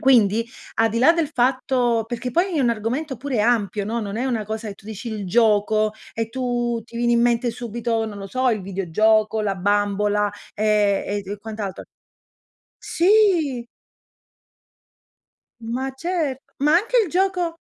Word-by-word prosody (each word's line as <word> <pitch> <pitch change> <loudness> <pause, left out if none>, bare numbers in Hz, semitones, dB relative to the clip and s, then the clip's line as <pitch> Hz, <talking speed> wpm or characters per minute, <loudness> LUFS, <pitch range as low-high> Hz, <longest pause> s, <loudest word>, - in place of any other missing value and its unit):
quindi, 230 -4 +4 0.3
al 225 0 +3
di 230 - -1
là 265 +7 +6
del 330 -3 0
fatto 250 -3 +1
perché 240 +1 -4
poi 350 +4 +1
è - - +2
un 245 -3 +3
argomento 250 +6 -2
pure 265 -5 -2
ampio, 210 -3 +1
no, 230 +3 -2
non 205 -1 -5
è 245 - -1
una 235 -5 -1
cosa 220 +2 -5
e 200 - -6
tu 195 - -21
dici 220 +2 -7
il 210 -2 -4
gioco 215 +1 +3 0.2
e 225 0 -3
tu 240 -2 -2
ti 235 - -12
viene 240 0 +2
in 235 - +3
mente 240 0 +2
subito, 230 -1 -2
non 210 -2 -6
lo 195 - -6
so, 255 +5 +1
il 215 -4 -1
videogioco, 215 +4 +1
la 200 -2 0
bambola, 205 +1 +1 0.3
ehm, 210 -1 +2
e 205 0 -1
d 195 - -14
e 205 - -5
quant'altro. 210 -2 -6 0.9
Sì! 345 - +2 2.0
Ma 245 +4 -3
cer 320 -4 -2 0.2
ma 295 +2 +3
anche 430 +8 +2
il 400 - -3
gioco 360 -2 0
230 Hz, 165 wpm, -22 LUFS, 210-260 Hz, 2.0 s, là